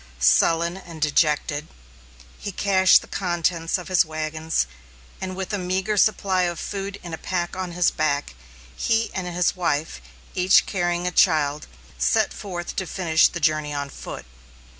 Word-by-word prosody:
Sullen 165 - +3
and 170 -4 -11
dejected, 150 0 +1 0.7
he 200 - -5
cached 190 -1 +4
the - - -13
contents 175 -2 -1
of 180 - -9
his 185 -2 +4
wagons, 155 - -2 0.6
and 185 -1 -4
with 190 +2 -5
a 205 - 0
meagre 185 +3 -1
supply 195 -2 +2
of 175 -2 -1
food 200 0 -5
in 170 -2 -7
a 160 - -5
pack 175 -1 -2
on 185 -2 -4
his 175 0 +2
back, 145 - -1 0.4
he 225 0 0
and 185 -1 -3
his 180 0 0
wife, 160 - -1 0.3
each 185 +2 +4
carrying 175 -2 -1
a 180 - 0
child, 150 -4 +2 0.3
set 60 - +2
forth 175 -3 -6
to 190 - -2
finish 165 -3 +3
the 175 - -6
journey 155 -2 0
on 140 -1 -4
foot. - - -8
175 Hz, 160 wpm, -23 LUFS, 155-185 Hz, 0.7 s, cached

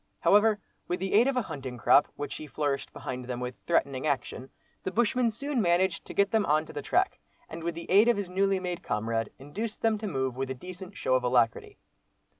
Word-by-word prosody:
However, 210 +1 +5 0.3
with 180 - -1
the 190 +1 -2
aid 225 +5 +6
of 275 -1 0
a 250 - +2
hunting 130 -8 -6
crop, 125 +4 +5
which 145 - -5
he 155 - -8
flourished 145 -2 -2
behind 125 -1 -6
them, 125 -1 -4
with 125 0 -4
threatening 140 -4 +1
action, 135 -2 -2 0.3
the - - -2
bushman 240 +4 +2
soon 260 +3 -2
managed 175 -1 +2
to - - -8
get 200 0 +3
them 220 -2 +3
on 155 +1 +3
to - - -11
the 145 - -4
track, - - +1 0.3
and 165 +1 -8
with 170 0 -2
the 170 - -6
aid 205 +5 +6
of 240 - +4
his 200 -2 -2
newly 195 +1 +1
made 180 -1 -4
comrade 115 +1 -1
induced 205 +12 -6
them 220 -2 +2
to 215 - -4
move 130 -7 -1
with 135 0 -3
a 130 - -3
decent 185 +6 -9
show 130 - 0
of 130 -1 +3
alacrity. 120 -2 +1
170 Hz, 225 wpm, -28 LUFS, 130-205 Hz, 0.3 s, aid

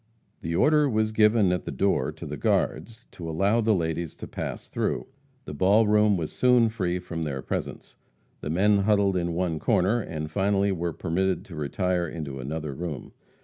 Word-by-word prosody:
The 85 0 -3
order 150 - +4
was 110 -2 +1
given 105 -2 +4
at 90 - -2
the - - -4
door 85 -9 +1
to - - -10
the - - -5
guards 115 +2 -1
to - - -20
to 85 -2 -5
allow 100 +8 +2
the 110 -1 +3
ladies 85 -1 -2
to - - -8
pass - - -6
through. - - -2 0.4
The - - -7
ball 100 +9 +4
room 105 -1 +3
was 80 -3 -4
soon 125 -2 +4
free 90 -5 -2
from 85 -2 -6
their 70 -4 -3
presence. - - -5 0.4
The - - -5
men 100 +5 +3
huddled 100 -1 +2
in 85 -2 -1
one 85 -3 -1
corner, 100 +10 +2
and 75 -4 -5
finally 100 +2 +1
were 85 -2 -2
permitted 90 +3 -1
to 85 - -10
retire 90 +4 -1
into 75 -4 -6
another 75 +2 -4
room. 80 -2 -6
90 Hz, 190 wpm, -26 LUFS, 80-105 Hz, 0.4 s, order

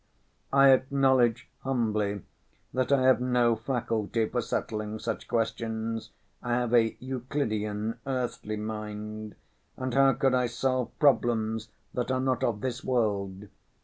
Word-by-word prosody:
I 135 0 +7
acknowledge 130 -3 +3
humbly 105 -6 -1 0.5
that 130 +1 0
I 135 -2 +4
have 130 -1 +5
no 125 -2 +3
faculty 115 -2 -1
for 120 - -1
settling 110 -1 -3
such 110 0 -4
questions, 115 0 -2 0.3
I 120 - -2
have 120 -1 0
a 115 -2 +4
Euclidian 115 -4 -2
earthly 125 -5 -2
mind, 105 0 -5 0.4
and 130 -1 -3
how 135 0 +5
could 135 +1 +2
I 125 -1 +2
solve 130 0 -1
problems 115 -6 +2 0.2
that 125 0 -2
are 130 0 +1
not 130 -1 0
of 110 -3 0
this 125 -1 -3
world? 105 -5 -1
120 Hz, 130 wpm, -28 LUFS, 110-130 Hz, 0.5 s, I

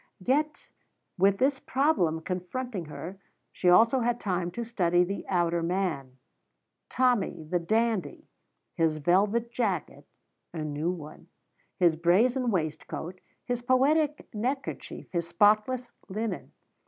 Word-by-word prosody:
Yet, 300 +3 0 0.5
with 195 +1 +3
this 265 +3 +2
problem 255 - +1
confronting 185 +4 -4
her, 175 +5 -8 0.3
she 180 - +1
also 230 +8 +6
had 240 0 0
time 180 -3 -1
to 235 - -3
study 180 -6 +2
the 195 +3 -4
outer 170 -2 +1
man, 165 -7 -2 0.7
Tommy 250 -10 +1
the 175 +3 -1
dandy 220 +3 -1 0.5
his 160 -3 +1
velvet 200 +9 +2
jacket 225 -6 -2 0.5
(a 160 - -3
new 150 +2 -2
one), 160 -4 -7 0.5
his 175 -4 +4
brazen 230 +10 +3
waistcoat, 165 0 -3 0.2
his 245 -1 -2
poetic 285 +4 +2
neckerchief, 255 +6 -4
his 170 -2 -2
spotless 215 +7 +2 0.2
linen. 215 +3 -4
195 Hz, 115 wpm, -28 LUFS, 170-245 Hz, 0.7 s, also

